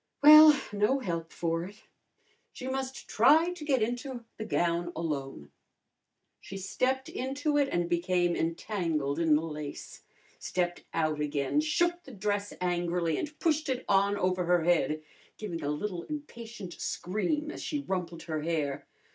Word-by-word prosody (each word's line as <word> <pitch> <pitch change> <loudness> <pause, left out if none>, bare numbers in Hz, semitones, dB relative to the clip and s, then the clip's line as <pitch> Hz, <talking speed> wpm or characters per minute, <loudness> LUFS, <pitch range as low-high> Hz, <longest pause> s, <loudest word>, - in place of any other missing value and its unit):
Well, 305 0 +10
no 210 +6 +2
help 170 -9 -4
for 165 0 -1
it. 205 +3 -13 0.7
She 255 - -7
must 265 0 -4
try 315 +10 +5
to 355 -4 -9
get 270 -6 +2
into 245 +1 -4
the 220 - -5
gown 175 -4 0
alone. 135 - -4 0.9
She 195 - -8
stepped 255 +8 -1
into 275 +4 -2
it 280 -1 +2
and 175 0 0
became 175 0 +1
entangled 165 -4 -1
in 160 -3 +4
the 155 - +1
lace; 150 -3 -7 0.4
stepped 175 -1 -2
out 155 -2 0
again, 145 - 0
shook 345 +3 +1
the 270 - -12
dress 205 0 -2
angrily 175 -2 0
and 300 0 -5
pushed 310 -2 +1
it 260 -1 -2
on 200 +1 +3
over 185 -1 0
her 175 -1 +3
head, 160 -2 +1 0.3
giving 175 -6 -5
a 145 - -1
little 175 +4 -3
impatient 235 - -8
scream 300 - -2
as - - -8
she 295 -2 -2
rumpled 175 -7 -4
her 155 -2 -3
hair. 150 -4 -2
185 Hz, 150 wpm, -29 LUFS, 165-265 Hz, 0.9 s, Well